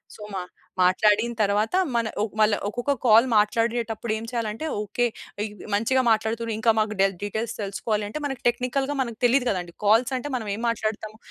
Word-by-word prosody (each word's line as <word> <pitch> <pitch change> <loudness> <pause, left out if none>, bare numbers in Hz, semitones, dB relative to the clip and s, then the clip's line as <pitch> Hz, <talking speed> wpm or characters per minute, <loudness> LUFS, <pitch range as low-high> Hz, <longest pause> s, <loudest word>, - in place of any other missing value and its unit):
So, - - -14
మా 190 - -2 0.4
మాట్లాడిన 210 +5 +3
తర్వాత 210 - +1 0.2
మన 230 -1 +1
ఒ - - +2 0.2
మళ్ళ 215 0 +4 0.2
ఒకొక్క 245 +6 -1
కాల్ 225 +1 +7
మాట్లాడేటప్పుడు 230 +1 +1
ఏం 220 - -5
చేయాలంటే 230 +3 -3 0.2
ఓకే. 210 +4 -1 0.4
ఇ - - -2 0.3
మంచిగా 230 +6 +2
మాట్లాడుతుర్రు 225 +1 0
ఇంకా 225 0 +3
మాకు 215 0 0
డె 195 - +6 0.2
డీటెయిల్స్ 220 +3 -3
తెలుసుకోవాలి 210 +1 -2
అంటే 215 +9 -5
మనకు 270 -3 -4
టెక్నికల్‌గా 255 +3 0
మనకు 235 -4 -4
తెలీదు 250 +1 +3
గదండీ! 175 -3 -3
కాల్స్ 225 +5 +4
అంటే 290 +4 -5
మనం 220 -4 -3
ఏం 225 - -7
మాట్లాడుతాము? 215 -1 -3
220 Hz, 170 wpm, -25 LUFS, 210-235 Hz, 0.4 s, కాల్